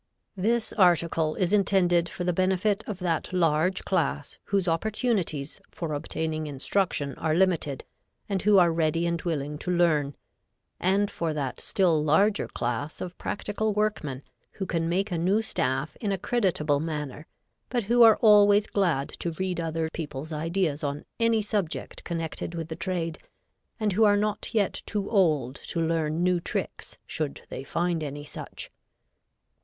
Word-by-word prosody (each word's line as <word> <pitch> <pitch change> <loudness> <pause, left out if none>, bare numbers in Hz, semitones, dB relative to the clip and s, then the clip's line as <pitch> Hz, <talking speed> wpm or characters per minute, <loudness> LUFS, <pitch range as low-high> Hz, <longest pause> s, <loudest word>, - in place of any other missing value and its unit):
This 225 +4 +1
article 170 -4 +3
is 180 +1 0
intended 180 -4 +3
for 180 - -5
the 180 0 +1
benefit 190 +4 +1
of 210 - -4
that 175 -3 -1
large 175 +1 +1
class 160 -5 -1
whose 195 -2 0
opportunities 175 - -1
for 165 -3 -4
obtaining 155 +1 -3
instruction 145 0 -1
are 160 -1 +1
limited, 170 -7 +1 0.4
and 195 -3 -1
who 205 -1 +5
are 175 -2 +6
ready 165 +1 +1
and 170 -1 -1
willing 150 -3 -3
to 180 - -5
learn, 155 -5 +2 0.6
and 200 +3 +2
for 165 -2 -2
that 135 -4 -3
still 170 -6 +2
larger 200 +8 +3
class 125 +6 -3
of 180 -1 -6
practical 210 +1 -2
workmen 180 -11 -1 0.3
who 190 - -4
can 165 -2 -1
make 195 +4 0
a 170 - -1
new 190 +6 +2
staff 150 -6 -1
in 210 -3 -2
a 195 - 0
creditable 185 -9 +1
manner, 150 -1 -4 0.4
but 240 -2 0
who 240 +4 +3
are 225 -2 +8
always 205 -1 +6
glad 170 -11 +1
to 170 - -4
read 185 +1 -2
others 165 -1 -2
people's 155 0 -5
ideas 160 -1 -1
on 145 0 -3
any 230 -1 +3
subject 205 -6 -3
connected 165 0 -3
with 165 -1 -5
the 160 - -4
trade 170 -2 -3 0.6
and 210 -2 +1
who 220 +4 +3
are 205 -1 +5
not 210 0 -1
yet 205 -4 0
too 205 -2 -2
old 150 - +2
to 170 - -5
learn 165 0 0
new 180 -1 +3
tricks - - -4
should 150 -3 -3
they - - -6
find 170 +3 -1
any 145 0 -5
such. 145 - -7
170 Hz, 160 wpm, -27 LUFS, 155-195 Hz, 0.6 s, are